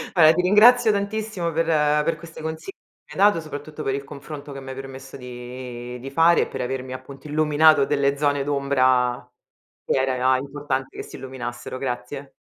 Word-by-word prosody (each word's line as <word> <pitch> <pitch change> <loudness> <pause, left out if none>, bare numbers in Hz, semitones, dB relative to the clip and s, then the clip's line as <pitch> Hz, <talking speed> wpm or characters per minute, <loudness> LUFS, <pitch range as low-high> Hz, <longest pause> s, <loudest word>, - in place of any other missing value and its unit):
Vabbè, 160 -2 +7
ti 180 - +1
ringrazio 220 +5 +6
tantissimo 200 -3 -2
per 165 +1 0 0.4
per 165 0 -1
queste 165 0 -11
consi 160 - -5
che - - -41 0.4
mi 195 - -2
hai 205 - +8
dato, 170 - -2
soprattutto 155 0 -7
per 135 - -1
il 140 0 -3
confronto 140 +1 -9
che 135 - -7
mi 130 - -9
hai 130 - -6
permesso 135 0 -9
di 125 0 -8
di 135 +2 -7
fare 165 +4 +4
e - - 0
per - - -5
avermi, 130 0 -4
appunto, 135 +2 -10
illuminato 150 -1 +4
delle 140 -1 +1
zone 145 -1 +1
d'ombra 130 -3 +1 0.6
che - - 0
era 130 -1 +1
e - - -4
a 130 +1 +3
importante 140 -1 -4
che - - -5
si - - -10
illuminassero. 130 -1 -6
Grazie. 130 +2 -5
140 Hz, 195 wpm, -23 LUFS, 130-160 Hz, 0.6 s, hai